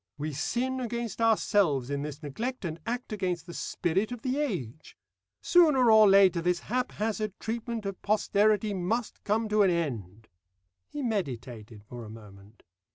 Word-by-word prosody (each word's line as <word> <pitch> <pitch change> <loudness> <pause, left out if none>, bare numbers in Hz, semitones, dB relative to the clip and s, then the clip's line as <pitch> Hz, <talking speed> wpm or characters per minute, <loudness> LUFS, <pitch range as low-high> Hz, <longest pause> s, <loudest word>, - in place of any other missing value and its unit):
We 150 +1 -4
sin 255 - -1
against 235 -3 -4
ourselves 195 - +2
in 140 0 -1
this 150 0 -7
neglect, 225 - -4
and 165 -1 -4
act 240 -1 -3
against 180 -5 -2
the 170 - -9
spirit 190 +8 -1
of 245 -2 -7
the 265 +2 -1
age. 160 - -4 0.5
Sooner 295 -9 +5
or 215 -2 +7
later 190 -3 +5
this 175 +1 0
haphazard 215 -3 -2
treatment 230 -1 -4
of 195 -1 -5
posterity 210 0 +2
must 205 +6 -2
come 220 +2 0
to 210 0 +3
an 195 - +5
end." 115 - -3 0.6
He 290 - -5
meditated 125 - -4
for 120 +3 -9
a 110 - -10
moment. 105 -1 -14
200 Hz, 155 wpm, -28 LUFS, 145-225 Hz, 0.6 s, or